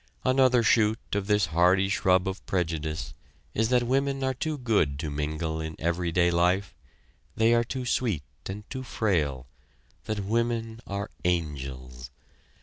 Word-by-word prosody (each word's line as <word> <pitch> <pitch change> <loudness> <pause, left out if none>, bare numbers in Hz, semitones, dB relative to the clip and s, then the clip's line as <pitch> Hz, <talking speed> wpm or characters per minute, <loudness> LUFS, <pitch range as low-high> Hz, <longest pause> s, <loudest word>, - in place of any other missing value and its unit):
Another 130 -2 +4
shoot 110 -1 +4 0.2
of 100 -1 -1
this 105 -2 +3
hardy 90 +3 +4
shrub 95 -2 +2
of 95 +1 -4
prejudice 80 -7 -2 0.4
is 110 +1 +1
that 125 -1 +3
women 135 +2 0
are 130 0 +1
too 150 +4 -3
good 105 - +1
to 75 0 -4
mingle 80 +2 -2
in 80 0 -5
everyday 85 +1 +1
life 90 +3 +2 0.6
they 115 +1 +4
are 120 0 +4
too 125 +2 -4
sweet 120 - 0 0.2
and 100 +2 -7
too 130 - -4
frail 80 - -1 0.6
that 110 -1 -2
women 115 +1 -1
are 100 +1 -4
angels. 65 -8 -3
95 Hz, 145 wpm, -27 LUFS, 80-115 Hz, 0.6 s, Another